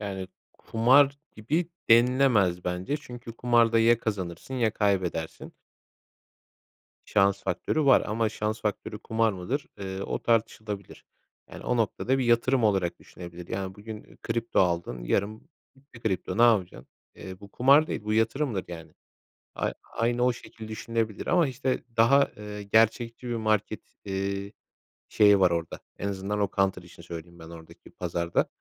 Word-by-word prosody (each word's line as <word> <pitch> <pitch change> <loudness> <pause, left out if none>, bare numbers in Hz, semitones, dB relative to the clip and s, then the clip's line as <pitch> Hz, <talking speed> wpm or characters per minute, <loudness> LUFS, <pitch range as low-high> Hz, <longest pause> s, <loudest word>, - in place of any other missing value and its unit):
Yani, 95 -3 -5 0.3
kumar 135 +5 +4 0.2
gibi 155 +10 -1 0.2
denilemez 115 -7 +4
bence 90 +10 -2
çünkü 120 -5 -10
kumarda 120 -2 +3
ya 115 +1 +5
kazanırsın 100 +2 -4
ya 120 -4 +2
kaybedersin. 90 -6 -1 1.5
Şans 100 -1 +2
faktörü 145 - -1
var. 135 - +6
Ama 110 +1 0
şans 110 +1 -3
faktörü 105 0 -3
kumar 110 0 0
mıdır, 100 +10 -3
ııı, 95 0 -4
o - - -4
tartışılabilir. 110 -3 -2 0.5
Yani, - - -10
o 125 - 0
noktada 120 +3 0
bir 130 - 0
yatırım 120 +1 +3
olarak 95 -5 +1
düşünebilir. 85 -1 -11
Yani, 95 -1 -4
bugün 105 +1 -10
kripto 115 0 0
aldın 85 -9 -1
yarın 105 - -1 0.3
bitti 135 -3 -17
kripto, 95 -3 -2
ne - - +5
yapacaksın? 100 - +2 0.3
Eee, 95 -1 -10
bu 100 - -12
kumar 140 +7 +5
değil, 105 - -4
bu 105 - -1
yatırımdır 115 -1 0
yani. 80 -2 -9 0.6
Ay - - -1 0.2
aynı 120 +1 +1
o 125 0 +3
şekil 110 -2 -11
düşünülebilir. 110 0 -3
Ama, 175 -4 +3
işte, 130 0 -2
daha, 140 +5 +5
eee, 105 -1 -7
gerçekçi 115 +3 +1
bir 120 - -2
market, 110 -1 0 0.2
eee, 100 +1 -3 0.6
şeyi 105 -2 +5
var 90 -2 +4
orada, 85 -1 -3 0.2
en 100 - -3
azından 100 +1 -3
o 100 -2 +1
Counter 95 -1 +1
işini 85 0 -15
söyleyeyim 85 0 -9
ben 80 0 -11
oradaki 80 -1 -13
pazarda. 85 -1 -1
105 Hz, 145 wpm, -27 LUFS, 95-120 Hz, 1.5 s, var